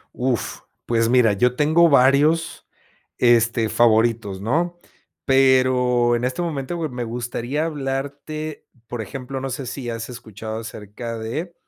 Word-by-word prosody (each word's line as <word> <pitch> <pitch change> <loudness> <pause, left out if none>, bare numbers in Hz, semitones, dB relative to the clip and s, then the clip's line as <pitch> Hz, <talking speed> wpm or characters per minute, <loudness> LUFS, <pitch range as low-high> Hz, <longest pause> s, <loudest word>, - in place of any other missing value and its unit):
Uf, 125 -3 -2 0.3
pues 115 -1 +1
mira, 120 -3 +4
yo 125 +5 +2
tengo 160 +4 +4
varios, 140 +4 +3 0.5
este, 115 -1 +3
favoritos, 115 -4 +2
¿no? 165 - 0 0.5
Pero 130 -2 +3
en 120 - -2
este 130 +6 -2
momento 160 -1 -3
me 125 -2 -4
gustaría 120 +5 -3
hablarte, 145 +1 -4 0.2
por 120 -1 -5
ejemplo, 130 +5 -6
no 135 +1 -4
sé 130 +1 -5
si 125 0 -5
has 115 0 -5
escuchado 110 -2 -7
acerca 115 +1 -7
de, 150 +11 -4
125 Hz, 130 wpm, -22 LUFS, 115-140 Hz, 0.5 s, mira